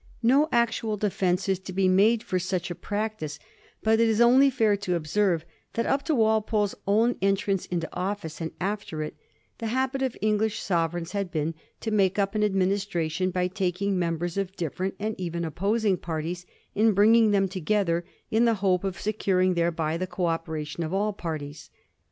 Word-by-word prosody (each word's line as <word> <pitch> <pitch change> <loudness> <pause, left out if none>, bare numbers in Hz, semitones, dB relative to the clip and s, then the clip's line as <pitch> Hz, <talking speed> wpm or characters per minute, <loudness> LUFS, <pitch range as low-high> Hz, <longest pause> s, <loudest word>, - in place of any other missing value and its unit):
No 275 +6 +4
actual 230 -2 +1
defence 190 -2 0
is 190 -2 +1
to 190 0 -8
be 190 +1 +2
made 210 +5 +4
for 185 - -1
such 180 0 -2
a - - -1
practice; 205 -6 -4 0.5
but 220 0 +3
it 230 - +4
is 220 0 +1
only 255 +4 +6
fair 225 -5 +2
to 190 -3 -1
observe 170 +1 +1 0.3
that 230 - -1
up 275 - +1
to 315 - +1
Walpole's 220 -2 +2
own 225 +4 +3
entrance 195 -1 +1
into 170 -2 -2
office, 180 -4 -4
and 165 - -2
after 190 -5 -3
it, 150 - -6 0.4
the 230 - -3
habit 260 +3 -1
of 260 -3 -1
English 215 +1 +1
sovereigns 170 -1 -1
had 200 -2 -2
been 160 -1 -1 0.3
to 220 - -3
make 195 -3 +2
up 200 0 +1
an 215 -1 +1
administration 190 -3 0
by 180 0 0
taking 190 +1 -1
members 170 +1 -2
of 195 -1 -2
different 180 +4 -3
and 215 +2 -2
even 170 -1 -3
of - - -2
opposing 205 +2 +1
parties 170 +2 -4 0.3
and 215 0 +3
bringing 220 +2 +6
them 195 -1 +3
together, 185 -1 0 0.3
in 225 +2 +4
the 230 -1 +3
hope 190 -2 +1
of 190 -3 -3
securing 190 -3 +1
thereby 165 -2 0
the 185 +2 -3
co 180 0 -2
operation 165 -1 -3
of 165 +4 -3
all 210 +2 0
parties. 150 -5 -6
195 Hz, 180 wpm, -26 LUFS, 175-215 Hz, 0.5 s, only